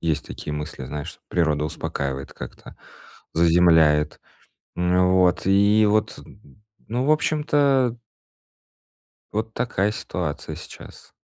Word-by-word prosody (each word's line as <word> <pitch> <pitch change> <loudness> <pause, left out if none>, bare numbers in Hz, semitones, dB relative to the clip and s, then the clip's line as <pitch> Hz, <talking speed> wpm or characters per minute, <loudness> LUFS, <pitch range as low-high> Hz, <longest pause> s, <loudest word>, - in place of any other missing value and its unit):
Есть 80 -3 -1
такие 75 - -7
мысли, 75 -2 -6
знаешь, 75 +2 -7
природа 75 -4 +1
успокаивает 70 -3 -4
как-то, - - -10 0.6
заземляет. 80 -3 +4 0.6
Ну 90 +1 +2
вот, 90 0 +3
и 100 +2 +4
вот, 105 0 0 0.7
ну, 125 +4 -1
в 150 - +3
общем-то 145 -5 +2 1.3
Вот 110 +1 -3
такая 105 -4 0
ситуация 85 -7 -5
сейчас. - - -12
90 Hz, 100 wpm, -23 LUFS, 75-110 Hz, 1.3 s, заземляет